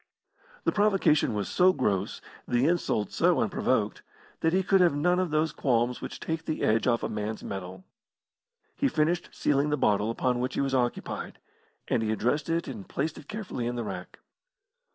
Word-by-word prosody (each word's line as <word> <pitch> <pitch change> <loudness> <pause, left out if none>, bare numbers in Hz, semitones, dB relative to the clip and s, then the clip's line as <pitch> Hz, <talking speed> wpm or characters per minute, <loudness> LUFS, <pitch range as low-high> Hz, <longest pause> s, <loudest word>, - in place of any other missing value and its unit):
The - - +2
provocation 195 - +3
was 100 -3 -2
so 185 - +4
gross, 100 - -1 0.3
the 120 +2 +2
insult 160 - 0
so - - +3
unprovoked, - - 0 0.4
that 160 - +2
he 190 +2 +2
could 195 +1 +4
have 175 -5 +4
none 180 +5 +2
of 185 -2 0
those 155 +1 +1
qualms 120 -2 0
which - - -6
take 160 0 -3
the 155 - -2
edge 110 +3 +2
off 120 -2 +2
a - - 0
man's 105 +1 -4
mettle. 95 - -6 0.9
He 280 - +1
finished 165 - 0
sealing 145 +1 +1
the 150 - +1
bottle 105 -3 +2
upon 125 +1 0
which 125 +1 -2
he - - +1
was 135 -1 -1
occupied, 120 -2 -2 0.5
and - - +1
he 110 -1 0
addressed 125 +9 0
it 165 +1 0
and 200 -4 -7
placed 150 +3 -2
it - - -15
carefully 200 - -4
in 120 - -2
the 120 - -2
rack. - - -7
140 Hz, 185 wpm, -28 LUFS, 115-170 Hz, 0.9 s, so